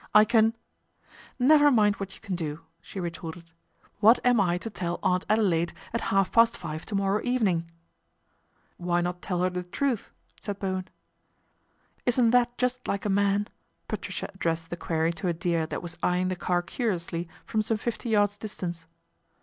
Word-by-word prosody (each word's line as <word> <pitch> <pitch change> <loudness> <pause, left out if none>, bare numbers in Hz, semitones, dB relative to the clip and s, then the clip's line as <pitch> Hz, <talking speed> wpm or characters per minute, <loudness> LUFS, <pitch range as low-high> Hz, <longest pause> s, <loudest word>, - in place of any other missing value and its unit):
" - - -46
I 215 0 +9
can 225 0 +3 0.3
" - - -39
" - - -22
Never 290 +3 +6
mind 210 -6 +4
what 195 -1 -6
you - - -17
can 200 -4 -5
do," 160 -2 -4 0.2
she 180 +3 -8
retorted. 170 -1 -6 0.2
" - - -34
What 225 +3 +7
am 245 -2 +5
I 175 -2 +2
to 225 +5 -5
tell 175 -3 -3
Aunt 180 0 +1
Adelaide 185 -6 +2 0.2
at 230 - 0
half 195 -1 +2
past 230 0 +5
five 155 -2 -6
to 210 - -3
morrow 195 +1 +1
evening? 195 -10 +1 0.5
" - - -43 0.3
"Why 175 0 0
not 175 0 -3
tell 180 -2 -2
her 185 - +3
the 180 0 -3
truth?" 230 +6 -2 0.3
said 205 -2 -4
Bowen. 185 -2 -2 0.6
" - - -40
Isn't 240 -1 +4
that 245 0 +3
just 250 0 -1
like 200 +1 -2
a - - +1
man? 200 +1 +2 0.2
" - - -46
Patricia - - -4
ad 190 - -19
dressed 165 0 -1
the - - -1
query 165 -1 0
to 180 - -4
a 175 - +2
deer 170 -2 0
that - - -5
was 170 -1 -7
eyeing 180 +1 +1
the 185 - -1
car 175 0 0
curiously 175 -4 -2 0.2
from 220 - 0
some 220 +1 0
fifty 235 +2 -3
yards 205 -1 +2
distance. 175 -6 -5
195 Hz, 200 wpm, -27 LUFS, 175-220 Hz, 0.6 s, I